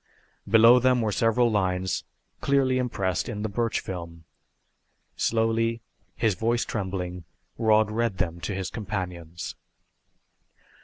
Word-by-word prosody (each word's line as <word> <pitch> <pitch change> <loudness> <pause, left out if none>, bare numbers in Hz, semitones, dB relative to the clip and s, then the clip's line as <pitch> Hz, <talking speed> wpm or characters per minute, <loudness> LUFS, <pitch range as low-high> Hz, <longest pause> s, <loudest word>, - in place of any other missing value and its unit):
Below 115 +3 +7
them 125 0 +3
were 110 -2 0
several 115 +3 +2
lines, 95 -2 0 0.3
clearly 135 -2 +2
impressed 100 -7 -1
in 105 0 -4
the 110 - -1
birch 115 +2 0
film. 85 -3 -7 0.9
Slowly, 115 0 +1 0.3
his 110 -2 +2
voice 115 +5 0
trembling, 90 -3 -4 0.4
Rod 110 -1 +4
read 115 -3 -1
them 85 -1 -2
to 100 +3 -4
his 95 -3 -4
companions. 90 -6 -5
105 Hz, 115 wpm, -26 LUFS, 95-115 Hz, 0.9 s, Below